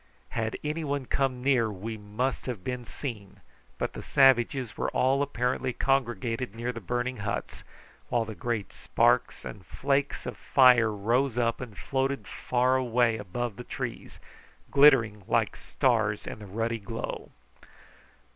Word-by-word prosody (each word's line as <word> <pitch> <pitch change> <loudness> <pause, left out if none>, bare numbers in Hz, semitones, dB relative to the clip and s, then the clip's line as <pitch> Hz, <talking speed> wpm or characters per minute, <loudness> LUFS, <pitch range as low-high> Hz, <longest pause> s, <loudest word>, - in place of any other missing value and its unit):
Had 110 -1 -2
anyone 150 -3 -2
come 130 -1 -1
near 125 -5 +3
we 105 +3 -5
must 110 +7 -3
have 115 -8 -4
been 125 +2 -4
seen, 110 -7 -7 0.4
but - - -2
the - - -6
savages 130 -2 +3
were - - -1
all 135 +2 +2
apparently 130 -2 -1
congregated 120 -3 0
near 120 +2 -2
the 115 - -7
burning 125 +5 -2
huts, 100 0 -4 0.5
while 120 -2 +1
the 110 - -6
great 110 -2 -3
sparks - - +1
and 95 - -8
flakes 140 - -1
of - - -5
fire 125 -4 +5
rose 115 +5 0
up 115 0 +1
and 115 -6 -8
floated 135 +4 -1
far 125 +1 +1
away 120 -2 +2
above 110 +3 -4
the 125 - -6
trees, - - -6 0.5
glittering 130 -7 +5
like - - +1
stars 110 -5 0
in - - -6
the 105 - -10
ruddy 115 +3 -2
glow. 115 +3 -5
120 Hz, 145 wpm, -28 LUFS, 110-130 Hz, 0.5 s, fire